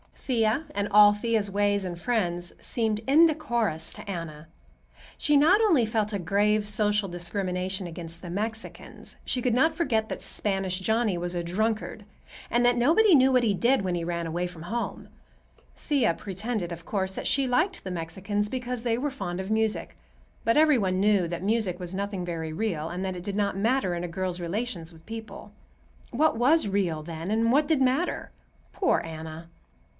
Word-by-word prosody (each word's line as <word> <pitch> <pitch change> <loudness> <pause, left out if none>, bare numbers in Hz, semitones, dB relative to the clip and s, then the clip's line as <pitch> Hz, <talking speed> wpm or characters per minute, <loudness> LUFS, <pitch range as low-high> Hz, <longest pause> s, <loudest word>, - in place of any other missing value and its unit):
Thea, 235 +3 0
and 205 0 -1
all 205 0 +8
Thea's 210 -1 0
ways 205 0 +1
and 175 -2 -5
friends, 175 -7 -1
seemed 220 -3 -1
indecorous 265 - +2
to - - -10
Anna. 165 -4 -6 0.7
She 295 - +2
not 320 +8 +6
only 335 - +4
felt 220 -1 -1
a 200 - -1
grave 205 +3 +1
social 210 -1 +1
discrimination 180 +1 -3
against 170 0 -8
the 175 - -8
Mexicans; 220 +5 -6
she 250 - -1
could 245 -1 +1
not 315 +6 +3
forget 230 -10 0
that - - -5
Spanish 195 -2 -1
Johnny 220 -1 +1
was 175 +1 -4
a 175 - -1
drunkard 215 +3 -2 0.4
and 240 +1 +2
that 245 0 +4
"nobody 340 - +5
knew 265 -2 +6
what 250 -1 +4
he 215 -3 +2
did 240 +6 +2
when 185 -2 -1
he 170 -1 -2
ran 170 0 -2
away 175 +2 -2
from 170 -2 -10
home." 230 +7 -4 0.7
Thea 265 - +1
pretended, 195 0 -4
of 170 0 -8
course, 190 -2 -2
that - - -4
she 275 -1 +2
liked 315 +10 +1
the 190 - -5
Mexicans 190 +5 -2
because 250 0 -4
they 230 -2 +1
were 285 +3 -2
fond 180 -10 -5
of 190 +2 -6
music; 220 0 0 0.5
but 230 - +3
every 305 -3 +5
one 185 -4 0
knew 200 -4 +3
that 170 +1 -5
music 210 -4 +1
was 180 0 -6
nothing 200 -1 -3
very 165 -2 -4
real, 165 -5 -2
and 180 +2 -4
that 185 -1 -3
it 175 - -7
did 200 +1 -4
not 200 -1 0
matter 225 -2 +1
in 175 0 -3
a - - -3
girl's 180 +1 -3
relations 175 -1 -4
with 160 0 -18
people. 220 -2 -8 0.6
What 300 0 +2
was 270 +2 +3
real, 185 -6 -1
then, 165 +2 -6
and 225 +2 +2
what 290 +3 +3
did 310 -4 +2
matter? 265 +7 0 0.4
Poor 380 - +1
Anna! 160 0 -8
205 Hz, 185 wpm, -27 LUFS, 175-240 Hz, 0.7 s, all